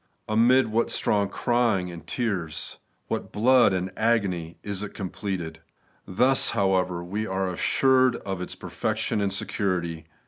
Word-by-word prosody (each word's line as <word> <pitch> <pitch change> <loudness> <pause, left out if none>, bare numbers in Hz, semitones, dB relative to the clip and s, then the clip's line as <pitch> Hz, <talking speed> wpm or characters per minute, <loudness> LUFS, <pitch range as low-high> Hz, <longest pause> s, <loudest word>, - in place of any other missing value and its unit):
Amid 120 +4 +4
what 115 +2 +1
strong 100 -1 +1
crying 115 -7 0
and 85 -1 -11
tears, 95 - -3 0.3
what - - -4
blood 120 +1 +4
and 95 0 -2
agony, 100 -8 0
is 100 -1 -2
it 105 - -7
completed! 90 -4 -5 0.5
Thus, 125 +8 +3
however, 95 -3 +1
we 105 +5 -3
axe 95 -2 -2
assured 130 -1 +4
of 95 -2 -5
its 90 - -5
perfection 105 - -2
and 100 -1 0
security. 90 -5 -2
100 Hz, 135 wpm, -25 LUFS, 90-115 Hz, 0.5 s, Amid